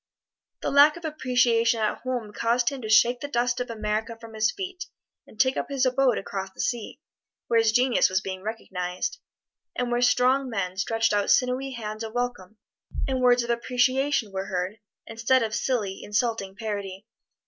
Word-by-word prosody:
The - - -1
lack 290 +3 +6
of 340 - -9
appreciation 245 -6 +2
at 215 -1 0
home 245 -5 -4
caused 235 +2 +1
him 275 -2 -7
to 220 - -6
shake 235 +3 +5
the 285 - -5
dust 245 -2 0
of 250 0 -3
America 220 +1 -3
from 230 -1 -12
his 215 0 +2
feet 375 +1 -5 0.4
and 215 - -18
take 260 0 +3
up - - -3
his 275 -2 +1
abode 255 -1 +2
across 195 0 -4
the 190 - -24
sea, 240 -1 -3 0.5
where 230 -1 +3
his 225 -1 +3
genius 250 +2 +3
was 185 0 +1
being 190 -1 -6
recognized, 195 - -4 0.6
and 245 -1 -2
where 240 0 +1
strong 255 +2 +3
men 190 -5 -3
stretched 225 +3 0
out 205 -1 +1
sinewy 260 +1 +2
hands 215 -2 -5
of 220 -1 -6
welcome, 240 -5 -3 0.5
and 260 -1 -1
words 245 -1 +4
of 235 - -2
appreciation 255 0 +1
were 190 0 -3
heard, 190 +2 -3 0.3
instead 230 +3 +1
of 220 -1 -3
silly, 210 -6 -1
insulting 210 -2 -1
parody. 200 -2 -5
235 Hz, 180 wpm, -26 LUFS, 210-255 Hz, 0.6 s, lack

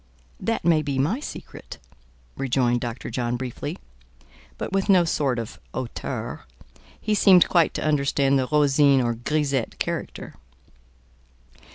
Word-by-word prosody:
"That 225 -7 -2
may 165 -3 +4
be 140 -3 -3
my 160 - +1
secret," 300 - -9 0.6
rejoined 125 -2 +1
Dr. 120 0 -5
John 120 -1 -1
briefly, 125 -1 -5 0.8
but - - -5
with 195 +1 0
no 185 -3 +6
sort 140 -5 0
of 115 -1 -6 0.2
hauteur: 130 -3 -5 0.5
he 215 - -1
seemed 190 -4 +6
quite 170 -3 +2
to - - -2
understand 140 -2 +2
the 130 - -1
Rosine 145 -2 +4
or 120 -2 +1
grisette 135 +1 -1
character. - - -4
140 Hz, 130 wpm, -24 LUFS, 125-160 Hz, 0.8 s, no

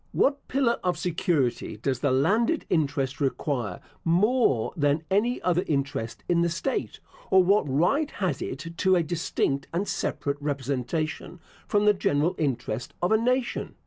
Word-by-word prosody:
What 280 0 +1
pillar 255 -3 +1
of 180 -2 0
security 160 - -1
does 130 +3 -1
the 140 - +1
landed 210 - +2
interest 140 -4 0
require 130 - -1 0.2
more 180 - +2
than 145 0 +1
any 230 +6 +2
other 180 0 +2
interest 135 -6 -2
in 170 -1 +2
the 170 - +2
state, 185 +11 -3 0.3
or 190 -1 +6
what 195 -5 +3
right 180 - +2
has 180 - -2
it 135 - -5
to 190 +2 +3
a 175 - +2
distinct 155 -4 -1
and 185 +5 -1
separate 140 0 -2
representation 145 +4 -3 0.3
from 205 0 +2
the 210 - +6
general 160 -3 +1
interest 125 -5 -2
of 175 - 0
a - - +6
nation? 250 +2 -1
165 Hz, 150 wpm, -26 LUFS, 140-200 Hz, 0.3 s, or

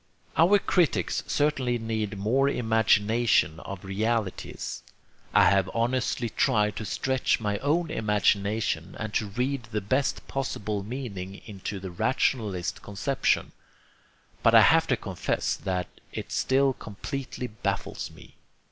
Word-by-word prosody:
Our 180 +6 +6
critics 180 -5 +1
certainly 135 -5 +1
need 110 -3 -3
more 130 +8 +2
imagination 110 - +2
of 95 +1 -8
realities. 110 +1 -2 0.5
I - - +6
have 95 0 +4
honestly 120 0 0
tried 105 -2 +2
to 110 - -4
stretch 130 +5 0
my 105 -2 -1
own 160 +3 +1
imagination 105 - 0
and 110 -2 -4
to 105 - 0
read 125 +4 -2
the 110 -1 -2
best 130 +7 -1
possible 110 -6 -2
meaning 100 -5 -6
into 100 -2 -6
the 95 -1 -7
rationalist 105 -2 0
conception, 125 +7 0 0.9
but - - +5
I - - +10
have - - +5
to - - +2
confess - - -2
that 90 -1 -2 0.2
it - - -6
still 135 0 +2
completely 130 +5 -6
baffles 105 -4 -3
me. - - -16
110 Hz, 125 wpm, -27 LUFS, 100-130 Hz, 0.9 s, I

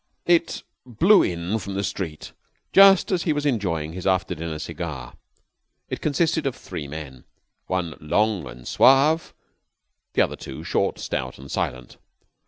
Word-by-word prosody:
It 170 -1 +2 0.2
blew 170 - +4
in 90 +5 -1
from 100 0 -6
the 100 - -1
street 85 -5 -5 0.4
just 195 -1 +7
as 180 -2 +1
he 160 - +1
was 145 0 -2
enjoying 85 - -1
his 90 +1 -5
after 95 -1 +1
dinner 80 -1 -5
cigar. 60 -5 -6 0.7
It - - -4
consisted 155 0 +1
of 135 - -2
three 70 - -7
men, 70 -4 -8 0.4
one 90 -3 -2
long 100 +1 0
and 60 -1 -11
suave, 145 +5 +4 0.8
the - - +4
other - - -3
two - - -9
short, - - 0
stout, 65 -1 -4
and 70 +1 -11
silent. 65 0 -3
95 Hz, 150 wpm, -24 LUFS, -, 0.8 s, just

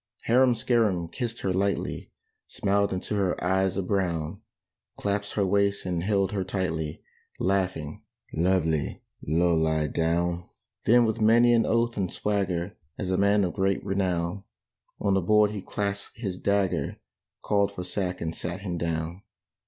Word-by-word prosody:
Harum 125 +1 +4
Scarum 110 -7 +1
kissed 120 +5 -4
her 95 - 0
lightly, 100 +2 -1 0.4
Smiled 100 0 +1
into 95 +3 -3
her 95 -3 0
eyes 95 +1 +1
of 95 - -1
brown, 85 -6 -1 0.6
Clasped 100 0 -2
her 100 - +2
waist 100 +1 +1
and 90 -2 -1
held 100 0 +1
her 100 -2 -1
tightly, 90 -5 -3 0.4
Laughing, 90 -6 -1 0.3
"Lovely 80 -3 +1 0.2
Low 85 +3 +2
lie 80 -1 +2
down!" 85 +3 0 0.4
Then 120 +1 +6
with 110 0 -1
many 120 +2 +6
an 115 -2 +3
oath 115 +1 +1
and 95 -3 -1
swagger, 95 -3 -1 0.2
As 95 -3 -3
a - - +2
man 100 +1 +4
of 90 - -1
great 95 0 0
renown, 95 -1 -1 0.6
On 100 -2 +1
the 95 - +3
board 105 +3 +4
he 105 -2 -5
clapped 100 +1 -3
his 100 -6 -4
dagger, 100 -2 0 0.5
Called 100 -1 +2
for 90 -2 -6
sack 90 0 -3
and 80 -1 -2
sat 90 +3 -4
him 90 -4 -3
down. 85 +2 -2
95 Hz, 150 wpm, -27 LUFS, 85-100 Hz, 0.6 s, Then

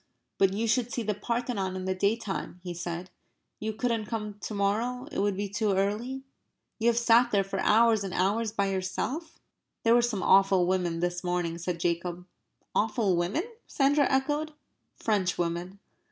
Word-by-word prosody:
"But 195 -1 +5
you 220 +4 -1
should 240 +1 +1
see 235 - -2
the 210 0 0
Parthenon 230 -4 -2
in 185 0 -4
the 190 - 0
day 200 +3 +2
time," 195 -5 -5
he 180 -1 -4
said. 175 +1 -5 0.5
"You 220 +1 -2
couldn't 225 -1 -1
come 210 -2 -4
to 215 - -5
morrow 225 +6 0
it - - -3
would 200 -1 +1
be 205 0 -1
too 205 +1 0
early?" 215 +8 -1 0.6
"You 225 - +1
have 235 -1 +3
sat 235 +1 +5
there 200 -3 +2
for 195 - -4
hours 225 -1 +4
and 195 - -4
hours 205 +5 +1
by 200 -2 0
yourself?" 210 - -3 0.5
"There 230 - +5
were 240 - +6
some 225 -6 -1
awful 195 -2 +5
women 175 -2 0
this 175 +1 -1
morning," 175 -2 -1
said 175 0 -3
Jacob. 175 +1 -2 0.5
"Awful 215 -3 +2
women?" 175 - 0 0.2
Sandra 285 +1 +3
echoed. 295 +3 0 0.4
"Frenchwomen." 180 -3 -1
205 Hz, 170 wpm, -28 LUFS, 185-230 Hz, 0.6 s, were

